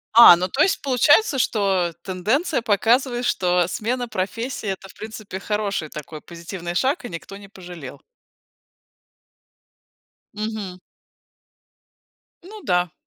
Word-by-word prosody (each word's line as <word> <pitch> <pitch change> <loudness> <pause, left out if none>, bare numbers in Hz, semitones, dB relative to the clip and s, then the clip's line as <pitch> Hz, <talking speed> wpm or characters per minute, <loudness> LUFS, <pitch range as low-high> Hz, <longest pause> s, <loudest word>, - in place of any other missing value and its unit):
А, 235 -7 +11
ну 180 +2 -2
то 265 +10 -1
есть, 385 - +3
получается, 280 - +4
что 195 -7 +1
тенденция 230 - 0
показывает, 240 +4 +2
что 180 -5 +2
смена 245 +4 -2
профессии- 220 +3 -3
это, 195 0 -5
в - - -15
принципе, 215 -3 -8
хороший 200 -7 -2
такой 150 +1 -8
позитивный 170 +1 -7
шаг, 265 - +1
и 245 - -6
никто 170 +3 -8
не 200 0 -11
пожалел. 175 -8 -10 2.4
Мгм. 210 -4 -5 1.6
Ну 420 +3 -11
да. 180 -2 +1
205 Hz, 115 wpm, -22 LUFS, 180-245 Hz, 2.4 s, А